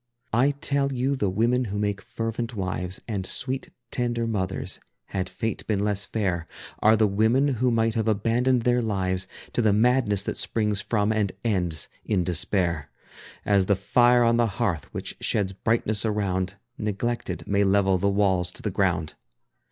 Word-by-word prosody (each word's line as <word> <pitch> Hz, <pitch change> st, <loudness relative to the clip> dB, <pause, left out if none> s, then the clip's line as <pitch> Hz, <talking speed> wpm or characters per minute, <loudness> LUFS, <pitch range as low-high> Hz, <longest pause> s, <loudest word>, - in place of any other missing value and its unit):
I 125 Hz, +5 st, +4 dB
tell 140 Hz, 0 st, 0 dB
you 130 Hz, +2 st, 0 dB
the 105 Hz, -7 st, 0 dB
women 120 Hz, +6 st, +1 dB
who 100 Hz, -1 st, -4 dB
make 100 Hz, -1 st, -1 dB
fervent 115 Hz, +3 st, -4 dB
wives 90 Hz, -1 st, -3 dB
And 100 Hz, -4 st, -2 dB
sweet 130 Hz, +7 st, -2 dB, 0.2 s
tender 120 Hz, -1 st, -1 dB
mothers, 95 Hz, -4 st, -2 dB, 0.3 s
had 95 Hz, -2 st, -2 dB
Fate 110 Hz, +3 st, -3 dB
been 105 Hz, -3 st, +1 dB
less 105 Hz, -1 st, +1 dB
fair, 90 Hz, -6 st, -2 dB, 0.3 s
Are 110 Hz, +1 st, +5 dB
the 110 Hz, -, +4 dB
women 110 Hz, +8 st, +3 dB
who 125 Hz, -1 st, +1 dB
might 115 Hz, -1 st, +2 dB
have 110 Hz, -1 st, -1 dB
abandoned 115 Hz, +4 st, +2 dB
their 125 Hz, 0 st, +3 dB
lives 95 Hz, -4 st, -1 dB, 0.3 s
To -, -, +1 dB
the 110 Hz, -3 st, +3 dB
madness 110 Hz, -3 st, +2 dB
that -, -, -3 dB
springs 105 Hz, -3 st, 0 dB
from 105 Hz, -1 st, +1 dB
and 105 Hz, -3 st, +1 dB
ends 90 Hz, -8 st, 0 dB, 0.2 s
in 100 Hz, -5 st, +1 dB
despair. 85 Hz, -3 st, 0 dB, 0.6 s
As 100 Hz, -2 st, +3 dB
the 100 Hz, -, +4 dB
fire 120 Hz, +5 st, +4 dB
on 115 Hz, 0 st, +3 dB
the 120 Hz, -1 st, +3 dB
hearth 95 Hz, -, -1 dB
which -, -, -6 dB
sheds 100 Hz, -3 st, 0 dB
brightness 110 Hz, +1 st, 0 dB
around, 100 Hz, -3 st, -1 dB, 0.2 s
Neglected, 105 Hz, +3 st, -2 dB
may 100 Hz, 0 st, +2 dB
level 95 Hz, -1 st, +3 dB
the 100 Hz, +2 st, +2 dB
walls 95 Hz, -3 st, +1 dB
to -, -, -13 dB
the 105 Hz, -, -1 dB
ground. 90 Hz, -4 st, 0 dB
105 Hz, 165 wpm, -25 LUFS, 95-115 Hz, 0.6 s, Are